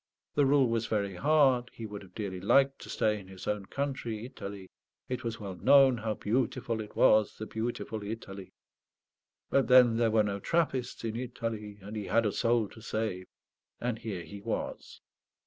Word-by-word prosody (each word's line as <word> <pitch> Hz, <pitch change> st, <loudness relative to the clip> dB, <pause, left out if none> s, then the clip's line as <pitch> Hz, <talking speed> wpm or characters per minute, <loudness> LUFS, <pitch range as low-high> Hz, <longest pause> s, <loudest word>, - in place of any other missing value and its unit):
The 145 Hz, -2 st, +3 dB
rule 135 Hz, -2 st, +4 dB
was 115 Hz, -1 st, 0 dB
very 100 Hz, -2 st, -1 dB
hard; 135 Hz, +1 st, +3 dB
he 115 Hz, -, -6 dB
would 105 Hz, -1 st, -7 dB
have 95 Hz, -2 st, -16 dB
dearly 100 Hz, -4 st, -4 dB
liked 135 Hz, +7 st, +4 dB
to -, -, -10 dB
stay 105 Hz, -1 st, +1 dB
in 95 Hz, -, -13 dB
his 95 Hz, -1 st, -10 dB
own 105 Hz, -2 st, -2 dB
country, 130 Hz, -6 st, -3 dB
Italy 100 Hz, -7 st, -8 dB, 0.4 s
it 125 Hz, 0 st, -3 dB
was 115 Hz, -1 st, -4 dB
well 100 Hz, -3 st, -5 dB
known 135 Hz, +4 st, +6 dB
how 110 Hz, 0 st, -2 dB
beautiful 115 Hz, 0 st, -1 dB
it 105 Hz, -, -10 dB
was, 110 Hz, -1 st, +4 dB
the 110 Hz, -, -5 dB
beautiful 110 Hz, -1 st, -4 dB
Italy; 100 Hz, -3 st, -7 dB, 1.0 s
but 135 Hz, -, +3 dB
then 125 Hz, -3 st, +7 dB
there 115 Hz, -1 st, +3 dB
were 110 Hz, -1 st, +4 dB
no 100 Hz, -1 st, -2 dB
Trappists 135 Hz, -4 st, -1 dB
in 115 Hz, -1 st, -3 dB
Italy; 115 Hz, -4 st, -4 dB
and 105 Hz, +3 st, -7 dB
he 105 Hz, -2 st, -4 dB
had 115 Hz, +1 st, +3 dB
a 105 Hz, -, +2 dB
soul 115 Hz, +1 st, +2 dB
to 110 Hz, -, -14 dB
save; 110 Hz, -5 st, -3 dB, 0.5 s
and 120 Hz, -2 st, -2 dB
here 100 Hz, -7 st, -5 dB
he 100 Hz, +2 st, -10 dB
was. -, -, -5 dB
110 Hz, 180 wpm, -30 LUFS, 105-125 Hz, 1.0 s, then